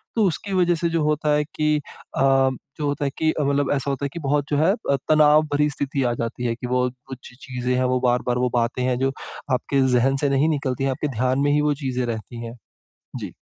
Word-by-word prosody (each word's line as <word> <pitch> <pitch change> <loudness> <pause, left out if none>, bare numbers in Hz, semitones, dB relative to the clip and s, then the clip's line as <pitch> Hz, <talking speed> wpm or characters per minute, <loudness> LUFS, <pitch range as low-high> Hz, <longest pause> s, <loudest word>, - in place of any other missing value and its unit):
तो 225 - +3
उसकी 190 +4 -3
वजह 175 -2 +3
से 170 +1 -1
जो 165 -1 0
होता 150 0 +1
है 150 - +2
कि 150 0 0
अ, 145 - -7
जो 135 +2 +1
होता 145 0 -1
है 140 - -1
कि 160 0 +2
अ, 155 - -2
मतलब 140 0 +1
ऐसा 140 0 -2
होता 140 0 -2
है - - -2
कि 170 - -5
बहुत 145 0 +2
जो 145 - +1
है 160 +5 +4 0.2
अ, - - +4
तनाव 155 0 +6
भरी 150 +1 +3
स्थिति 140 -1 -2
आ 120 -1 +1
जाती 115 +1 -4
है 115 -1 0
कि 125 +1 -6
वो 125 0 +1 0.2
कुछ 130 -2 -10
चीज़ें 125 -1 -2
हैं, 130 - +1
वो 130 0 +1
बार-बार 125 0 +1
वो 125 0 +1
बातें 120 +1 0
हैं, 125 -1 +1
जो 135 0 +1 0.4
आपके 135 +2 +1 0.2
ज़हन 135 +3 +2
से 145 - +2
नहीं 140 +3 +2
निकलती 135 -4 -1
हैं। 135 - +1
आपके 130 +3 -2
ध्यान 130 +2 +1
में 145 +1 +2
ही 150 +1 +3
वो 150 0 +2
चीज़ें 125 -1 -1
रहती 115 +1 -5
हैं। 115 - -7 0.7
जी। - - -6
135 Hz, 245 wpm, -23 LUFS, 125-150 Hz, 0.7 s, तनाव